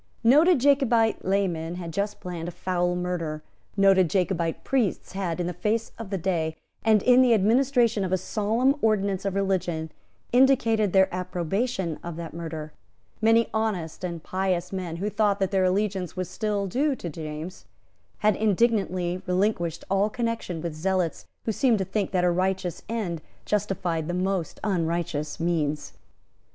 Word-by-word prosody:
Noted 300 Hz, +9 st, +6 dB
Jacobite 245 Hz, -5 st, +3 dB
laymen 175 Hz, -4 st, 0 dB
had 170 Hz, -2 st, -6 dB
just 205 Hz, +4 st, -2 dB
planned 175 Hz, -2 st, -5 dB
a -, -, -4 dB
foul 180 Hz, -1 st, 0 dB
murder. 170 Hz, -4 st, -3 dB, 0.3 s
Noted 195 Hz, -3 st, +5 dB
Jacobite 175 Hz, -3 st, 0 dB
priests 245 Hz, -9 st, 0 dB
had, 180 Hz, -3 st, -3 dB
in 175 Hz, -, 0 dB
the 180 Hz, -, -2 dB
face 215 Hz, +6 st, -1 dB
of 225 Hz, -4 st, -6 dB
day, 160 Hz, -4 st, 0 dB, 0.3 s
and 215 Hz, -2 st, +4 dB
in 250 Hz, 0 st, +6 dB
the 245 Hz, -3 st, +5 dB
administration 235 Hz, 0 st, +3 dB
of 185 Hz, -, -2 dB
a 185 Hz, -, +3 dB
solemn 225 Hz, +8 st, +1 dB
ordinance 200 Hz, -3 st, +1 dB
of 195 Hz, -1 st, -1 dB
religion, 175 Hz, -5 st, -1 dB, 0.4 s
indicated 235 Hz, -5 st, +4 dB
their 190 Hz, 0 st, +5 dB
approbation 180 Hz, 0 st, -2 dB
of 170 Hz, -1 st, -5 dB
that 165 Hz, -1 st, -7 dB
murder. 160 Hz, -2 st, -6 dB, 0.5 s
Many 225 Hz, +1 st, +4 dB
honest 205 Hz, -8 st, -2 dB
and 170 Hz, -3 st, -4 dB
pious 185 Hz, -1 st, -1 dB
men, 180 Hz, -3 st, -3 dB
who 200 Hz, +5 st, -2 dB
thought 210 Hz, -1 st, +2 dB
that 195 Hz, -1 st, 0 dB
their 190 Hz, -2 st, +2 dB
allegiance 190 Hz, -1 st, -1 dB
was 185 Hz, -1 st, -2 dB
still 205 Hz, +1 st, -2 dB
due 270 Hz, +9 st, +1 dB
to 180 Hz, -, -7 dB
James, 155 Hz, -, -7 dB, 0.6 s
had 210 Hz, -1 st, +4 dB
indignantly 195 Hz, -4 st, +1 dB
relinquished 180 Hz, -3 st, 0 dB
all 195 Hz, +2 st, +2 dB
connection 230 Hz, -7 st, -3 dB
with 170 Hz, -2 st, -3 dB
zealots 180 Hz, +1 st, -1 dB, 0.2 s
who 225 Hz, -, +1 dB
seemed 235 Hz, +1 st, +2 dB
to 190 Hz, -, -1 dB
think 200 Hz, 0 st, -1 dB
that 180 Hz, -2 st, 0 dB
a 180 Hz, -, +4 dB
righteous 185 Hz, -1 st, -1 dB
end 195 Hz, -8 st, -2 dB, 0.2 s
justified 190 Hz, -6 st, -1 dB
the 175 Hz, -, -2 dB
most 185 Hz, -2 st, -1 dB
unrighteous 165 Hz, -5 st, -1 dB
means. 155 Hz, -3 st, -1 dB
190 Hz, 155 wpm, -26 LUFS, 175-215 Hz, 0.6 s, Noted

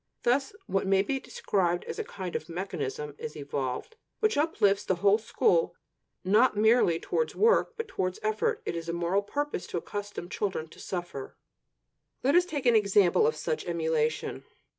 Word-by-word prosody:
Thus 270 Hz, +8 st, +1 dB
what 195 Hz, -, -1 dB
may 195 Hz, 0 st, +4 dB
be 270 Hz, +6 st, -1 dB
described 175 Hz, -8 st, -1 dB
as -, -, -6 dB
a -, -, 0 dB
kind 185 Hz, -3 st, -6 dB
of -, -, -4 dB
mechanism 150 Hz, -5 st, -4 dB
is 150 Hz, -, -6 dB
evolved, 140 Hz, -, -4 dB, 0.2 s
which 435 Hz, 0 st, +2 dB
uplifts 210 Hz, -10 st, +2 dB
the 185 Hz, -, +1 dB
whole 200 Hz, +4 st, +4 dB
school, 455 Hz, -, +2 dB, 0.5 s
not 210 Hz, +4 st, +4 dB
merely 220 Hz, -6 st, +4 dB
towards 475 Hz, -, -1 dB
work, 465 Hz, +2 st, +3 dB
but 455 Hz, -1 st, -3 dB
towards 185 Hz, -1 st, -2 dB
effort. 215 Hz, 0 st, 0 dB
It -, -, -2 dB
is 165 Hz, 0 st, -5 dB
the 170 Hz, -, -2 dB
moral 175 Hz, +3 st, +1 dB
purpose 285 Hz, +1 st, -3 dB
to -, -, -3 dB
accustom 205 Hz, 0 st, -5 dB
children 190 Hz, -4 st, -2 dB
to -, -, -15 dB
"suffer." 175 Hz, -7 st, -6 dB, 0.9 s
Let 275 Hz, +3 st, +3 dB
us 350 Hz, +1 st, +5 dB
take 290 Hz, -7 st, -4 dB
an 240 Hz, -2 st, +5 dB
example 205 Hz, -, +4 dB
of 465 Hz, -, 0 dB
such 470 Hz, -, -2 dB
emulation. 160 Hz, -2 st, -1 dB
200 Hz, 170 wpm, -28 LUFS, 170-260 Hz, 0.9 s, us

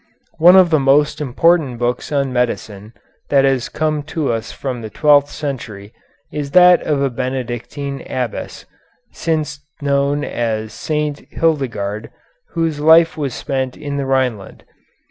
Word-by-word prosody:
One 175 Hz, +3 st, +8 dB
of 185 Hz, -3 st, +6 dB
the 155 Hz, -, +4 dB
most 140 Hz, +2 st, +2 dB
important 150 Hz, -1 st, +2 dB
books 120 Hz, +3 st, -2 dB
on 140 Hz, -3 st, 0 dB
medicine 110 Hz, -3 st, -3 dB, 0.4 s
that 135 Hz, -1 st, +4 dB
has 135 Hz, -3 st, 0 dB
come 155 Hz, -1 st, -1 dB, 0.2 s
to 150 Hz, -6 st, +1 dB
us 115 Hz, +1 st, -4 dB
from 130 Hz, -3 st, -5 dB
the 110 Hz, -, -7 dB
twelfth 145 Hz, +3 st, +3 dB
century 115 Hz, -9 st, -6 dB, 0.4 s
is 145 Hz, -2 st, -3 dB
that 180 Hz, 0 st, +7 dB
of 145 Hz, -2 st, 0 dB
a 135 Hz, -, 0 dB
Benedictine 130 Hz, +2 st, -4 dB
abbess, 125 Hz, -2 st, -4 dB, 0.5 s
since 155 Hz, -3 st, -2 dB, 0.2 s
known 140 Hz, 0 st, 0 dB
as 110 Hz, -4 st, -3 dB
St. 150 Hz, -2 st, -3 dB
Hildegarde, 115 Hz, -10 st, -1 dB, 0.4 s
whose 165 Hz, -3 st, -1 dB
life 160 Hz, +2 st, +5 dB
was 140 Hz, -5 st, -3 dB
spent 130 Hz, -2 st, -3 dB
in 145 Hz, -1 st, -5 dB
the 140 Hz, -1 st, -2 dB
Rhineland. 125 Hz, -7 st, -1 dB
140 Hz, 140 wpm, -18 LUFS, 125-150 Hz, 0.5 s, One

